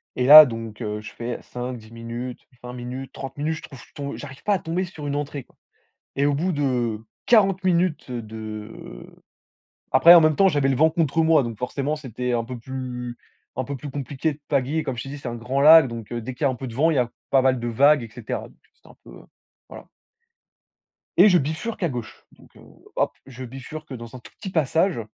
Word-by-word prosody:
Et 125 - 0
là 150 +3 +12
donc, 115 -2 -7
heu, 105 -1 -4
je 110 - -9
fais 120 +1 -5
5-10 125 -3 -7
minutes, 115 +2 -6 0.2
20 125 0 -7
minutes, 125 +2 -7
30 135 +1 -8
minutes, 155 +2 -1
je - - -10
trouve 135 - -12
je - - -17
tombe 140 -1 -5
j'arrive 130 0 -10
pas 210 - +2
à 195 - +1
tomber 170 +3 -2
sur 160 -5 -7
une 140 - -2
entrée, 145 -2 -4
quoi. - - -30 0.6
Et 140 - +1
au 145 - +2
bout 170 +7 0
de 125 -7 -1 0.3
40 195 -5 +4
minutes 175 -7 0
de, 110 -2 -7
heu - - -12 0.8
après 170 +6 +8
en 170 - +9
même 155 -1 +3
temps, 195 -1 +5
j'avais 145 -2 +1
le 135 - +1
vent 160 +5 +4
contre 165 -1 0
moi. 160 -4 +4
Donc 115 -2 -5
forcément, 140 +5 -2
c'était 125 -4 -4
un 115 -1 0
peu 125 +1 -7
plus 125 -1 -6 0.4
un 130 - -2
peu 140 +3 -5
plus 145 +2 -8
compliqué 145 +2 -3
de 145 - -16
pagayer. 145 +3 0
Comme 130 - -4
je 115 - -4
t'ai 135 - -8
dit, 145 - -7
c'est 135 - -8
un 120 - -5
grand 125 +4 -2
lac, 155 -1 +8
donc 115 -2 -7
dès 120 +2 -5
qu'il 125 - -7
y - - +5
a - - +1
un 130 - -5
peu 130 +1 -7
de 115 - -9
vent, 160 +6 +3
il - - 0
y - - +1
a 120 - 0 0.2
pas 135 - +5
mal 130 -1 +2
de 120 - -4
vagues 140 +4 +4
et 115 - -9
cetera. 115 0 -6
Donc, - - -24 0.2
c'était 470 - -24
un - - -18
peu - - -14 0.6
voilà. - - -11 1.3
Et 200 +4 +8
je 180 - +5
bifurque 160 +10 -3
à 170 - +1
gauche. 120 -4 -8
Donc, - - -21
heu, - - -16 0.3
hop, - - +1
je 130 -1 -10
bifurque 135 +3 -9
dans 120 0 -9
un - - -8
tout - - -15
petit 195 - -6
passage. 165 -1 +1
135 Hz, 235 wpm, -23 LUFS, 120-155 Hz, 1.3 s, là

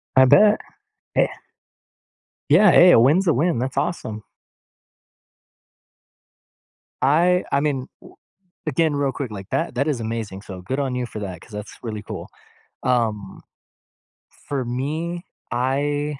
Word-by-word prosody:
I 130 - +7
bet. 210 +10 +6 0.6
Yeah. - - +4 1.2
Yeah, 180 +5 +7
hey, 180 0 +8
a - - +7
win's 160 +10 +4
a 165 - +4
win. 150 -1 +1
That's 130 +2 -3
awesome! 110 -10 -3 2.8
I 175 +6 +3
I 140 - +3
mean, 140 -3 -1
w - - -16 0.5
again, 155 +1 +1
real 140 -1 0
quick, 130 -6 -5
like, 100 -1 -8
that - - -1
that 140 +5 0
is 140 -6 -1
amazing, 110 -4 -4
so 95 -3 -9
good 130 +10 -3
on 135 -2 -1
you 125 -1 -2
for 110 - -7
that 95 -4 -6
'cause 115 - -17
that's 105 0 -8
really 110 -3 -5
cool. - - -7 0.6
Um, 115 -5 -1 1.1
for 135 -3 -2
me, 155 +8 -3 0.3
I 145 +3 -1
130 Hz, 135 wpm, -22 LUFS, 115-150 Hz, 2.8 s, hey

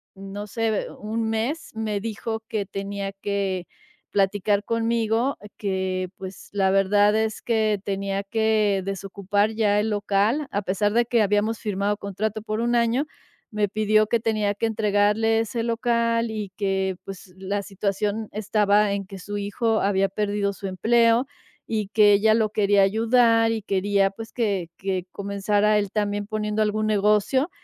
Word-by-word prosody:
no 195 +2 -7
sé, 225 +1 -1
eh, 215 - -1
un 220 +1 -2
mes, 240 +9 -2
me 215 -2 -2
dijo 220 +1 -4
que 210 -3 -2
tenía 200 0 -4
que 195 -3 -2 0.4
platicar 200 +1 +1
conmigo, 230 +2 0 0.2
que, 190 -2 -2
pues, 190 -1 -9
la 190 -1 +2
verdad 205 +2 +4
es 220 0 -1
que 220 -3 +1
tenía 195 0 -2
que 215 -2 +1
desocupar 200 +2 -1
ya 210 -2 +2
el 215 +1 0
local, 210 +7 +1
a 205 0 -1
pesar 205 +3 0
de 240 0 +3
que 235 -1 +2
habíamos 210 +2 +1
firmado 205 -1 -1
contrato 210 +2 -3
por 215 0 -3
1 240 0 0
año. 235 +5 +2 0.5
Me 210 -1 +1
pidió 215 +1 +2
que 235 - +1
tenía 215 -2 0
que 230 - -1
entregarle 215 +1 +2
ese 225 +1 -2
local 230 -1 +1
y 210 -3 -5
que, 190 -2 0
pues, 190 -1 -10
la 200 +2 -2
situación 205 +2 -2
estaba 210 -1 +2
en 200 -1 -3
que 195 -2 -9
su 205 +2 -5
hijo 220 +2 0
había 195 0 +2
perdido 205 0 -1
su 195 +1 -6
empleo, 230 +6 +3 0.4
y 215 -3 -2
que 210 -1 +5
ella 215 +2 +4
lo 220 -2 +2
quería 205 -2 +3
ayudar 225 +2 +3
y 225 -1 -2
quería, 195 0 +1
pues, 225 +2 -10
que 200 -8 -1
que 190 -2 -2
comenzara 205 +1 +1
él 200 -2 -3
también 205 -1 -1
poniendo 215 0 -2
algún 215 +1 0
negocio. 210 - +2
210 Hz, 160 wpm, -24 LUFS, 200-220 Hz, 0.5 s, que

